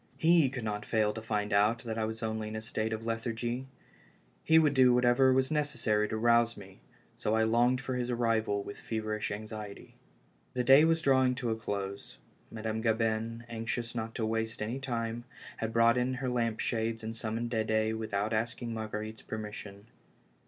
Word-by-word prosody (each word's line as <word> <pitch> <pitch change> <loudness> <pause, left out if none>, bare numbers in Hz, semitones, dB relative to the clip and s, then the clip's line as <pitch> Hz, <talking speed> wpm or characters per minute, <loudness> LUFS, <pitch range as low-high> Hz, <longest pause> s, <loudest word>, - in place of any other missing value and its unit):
lie 165 -4 +5
could 130 -4 -5
not 105 -1 -3
fail 105 -1 +1
to 110 - -6
find 105 -2 -2
out 105 +3 +3
that 115 -2 -4
I 110 - +1
was 110 +1 -5
only 110 -1 -2
in 110 - -6
a 110 - -3
state 110 0 -2
of 110 +1 -4
lethargy; 120 +2 -2 0.8
he 160 - +5
would 155 -3 +5
do 130 -2 +6
whatever 125 +2 +4
was 130 +2 +2
necessary 120 -8 +1
to 110 - -2
rouse 115 0 +3
me, 95 -2 -12 0.4
so 105 - 0
I 110 - +3
longed 120 +3 +3
for 130 -1 -3
his 125 -1 -2
arrival 115 -4 +1
with 100 - -8
feverish 110 -1 -3
anxiety. 105 -1 -7 0.6
The 125 - +1
day 135 +5 +7
was 165 0 +2
drawing 130 -2 +4
to 125 -2 -2
a - - +1
close. 100 -3 -5 0.3
Madame 110 0 -3
Gabin, 115 0 0
anxious 115 0 -3
not 115 -1 -4
to 115 - -1
waste 110 0 -2
any 115 +5 -3
time, 120 -3 -3 0.3
had 115 0 -2
brought 115 +1 +4
in 125 +1 0
her 130 0 -2
lamp 115 -3 0
shades 115 -1 -1
and 110 +1 -4
summoned 115 +1 -3
Dede 110 -1 +1
without 110 -1 -2
asking 115 +1 -2
Marguer 110 -1 -4
ite's 110 0 -10
permission. 105 -2 -7
115 Hz, 185 wpm, -31 LUFS, 110-120 Hz, 0.8 s, day